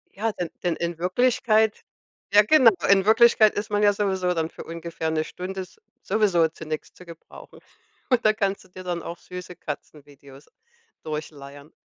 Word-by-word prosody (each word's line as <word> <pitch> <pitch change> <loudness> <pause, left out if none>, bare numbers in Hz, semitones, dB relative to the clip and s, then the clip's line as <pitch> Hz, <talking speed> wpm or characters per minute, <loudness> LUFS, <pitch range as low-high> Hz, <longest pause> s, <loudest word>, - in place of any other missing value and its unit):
Ja, 220 +2 -1
denn 175 -4 -5
denn 175 -2 0
in 170 -1 -3
Wirklichkeit 220 +3 +1 0.5
ja 210 +1 +7
genau. 250 -1 +6 0.2
In 195 -1 +5
Wirklichkeit 225 -1 +5
ist 205 +1 -3
man 205 0 +1
ja 205 0 +5
sowieso 190 -3 0
dann 165 -2 -2
für - - -10
ungefähr 165 -1 -5
'ne 155 0 0
Stunde 190 +3 -6
s 185 - -12 0.2
sowieso 190 -5 +2
zu 155 0 -11
nix 155 0 -5
zu 180 - -15
gebrauchen. 170 -1 -14 0.5
Und 250 -2 +2
da 215 - +5
kannst 200 -2 -2
du 185 - -21
dir 185 0 -11
dann 175 -2 -3
auch 170 - -7
süße 180 0 -9
Katzenvideos 145 -2 -10 0.6
durchleiern. 145 -1 -8
180 Hz, 170 wpm, -24 LUFS, 160-210 Hz, 0.6 s, ja